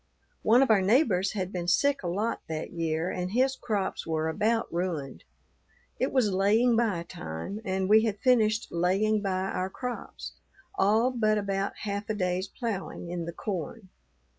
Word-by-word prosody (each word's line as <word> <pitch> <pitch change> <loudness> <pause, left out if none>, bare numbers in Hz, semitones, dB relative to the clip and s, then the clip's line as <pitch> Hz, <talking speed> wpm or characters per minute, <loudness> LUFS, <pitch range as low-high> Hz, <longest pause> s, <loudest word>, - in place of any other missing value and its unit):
One 240 +4 +5
of 265 - +2
our 205 -3 +5
neighbors 200 - +3
had 190 -3 -3
been 175 -1 -3
sick 280 +10 +3
a 180 - -4
lot 205 +7 -1
that 160 -1 -4
year 165 0 -1
and 180 0 -3
his 260 +2 +2
crops 210 -9 -2
were 160 0 0
about 225 +6 +1
ruined. 165 - -3 0.7
It 260 - 0
was 245 -6 +2
laying 215 +6 +3
by 215 -7 +1
time 80 - -6
and 190 -2 -1
we 215 +2 +6
had 210 -2 -1
finished 220 -2 +2
laying 195 +5 +1
by 190 -1 -1
our 185 +1 -2
crops 250 +4 -6 0.4
all 225 - +3
but 215 -3 +2
about 195 -1 -1
half 205 0 -3
a 215 - 0
day's 185 -1 -1
ploughing 195 -6 -5
in 175 -1 -3
the 170 - -4
corn. 190 +2 -5
200 Hz, 165 wpm, -28 LUFS, 180-225 Hz, 0.7 s, we